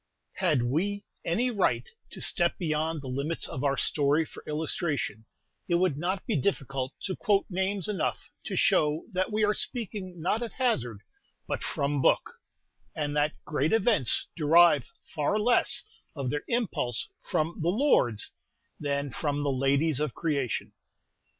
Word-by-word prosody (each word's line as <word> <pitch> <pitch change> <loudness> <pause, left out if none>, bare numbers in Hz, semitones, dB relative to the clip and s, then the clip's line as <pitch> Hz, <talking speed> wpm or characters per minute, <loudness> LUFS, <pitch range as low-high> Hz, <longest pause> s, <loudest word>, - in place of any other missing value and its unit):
Had 155 -10 +2
we 195 +11 -1 0.2
any 240 +10 +1
right 210 - +1 0.2
to - - -8
step 175 -2 +3
beyond 155 -2 -1
the - - -7
limits 140 +6 -2
of 130 - -5
our 140 -1 +1
story 150 +2 +2
for - - -12
illustration, 150 - -2 0.4
it 175 - +2
would 175 -4 +2
not 175 +6 -2
be - - 0
difficult 135 -4 -1
to 185 - -2
quote 200 -2 +2
names 190 +1 0
enough 200 -6 -2
to - - -3
show 150 +1 +3
that 185 +2 -1
we 215 +1 +1
are 210 - +2
speaking 200 -7 -3
not 190 +8 0
at 235 - -4
hazard, 125 - 0 0.5
but - - -2
"from 140 0 -1
book," - - +3 0.6
and 145 -1 -2
that 150 +1 +2
great 150 +3 0
events 220 - +4
derive 160 -3 +5 0.2
far 150 +7 +1
less 240 +3 +3 0.3
of 135 -4 -2
their 150 - -1
impulse 210 - 0
from 165 -1 -2
"the 165 - +1
lords" 180 - +2 0.5
than 140 -1 -2
from 145 0 -2
"the 140 - +1
ladies 135 +3 +2
of 150 -5 -2
creation." 140 -7 -2
155 Hz, 150 wpm, -28 LUFS, 140-190 Hz, 0.6 s, derive